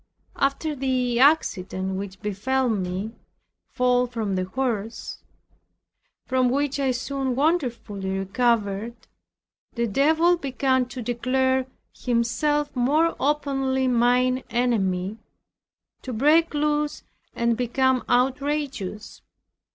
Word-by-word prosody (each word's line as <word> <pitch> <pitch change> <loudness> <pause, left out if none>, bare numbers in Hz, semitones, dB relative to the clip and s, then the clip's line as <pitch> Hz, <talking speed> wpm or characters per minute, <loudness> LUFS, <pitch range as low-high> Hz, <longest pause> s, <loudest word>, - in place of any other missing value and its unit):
After 280 +3 0
the 255 -3 0
accident 190 - +2
which 195 0 -6
befell 250 +6 0
me 190 0 -2 0.6
(fall 250 -1 +2
from 225 -4 -3
the 185 -1 -1
horse) 225 0 -3 1.1
from 255 -1 +2
which 280 +2 0
I 270 -1 +1
soon 260 +1 -2
wonderfully 240 - -1
recovered, 210 +1 0 0.8
the 235 0 0
Devil 315 - +3
began 260 -3 0
to 250 -1 -7
declare 260 +2 0 0.3
himself 280 +5 0
more 300 +7 +2
openly 270 -2 0
mine 250 +1 +2
enemy, 210 -4 0 0.8
to 260 - -6
break 300 +7 +3
loose 295 0 0 0.3
and 235 0 +1
become 255 +2 +1
outrageous. 260 -4 -1
250 Hz, 95 wpm, -24 LUFS, 230-275 Hz, 1.1 s, Devil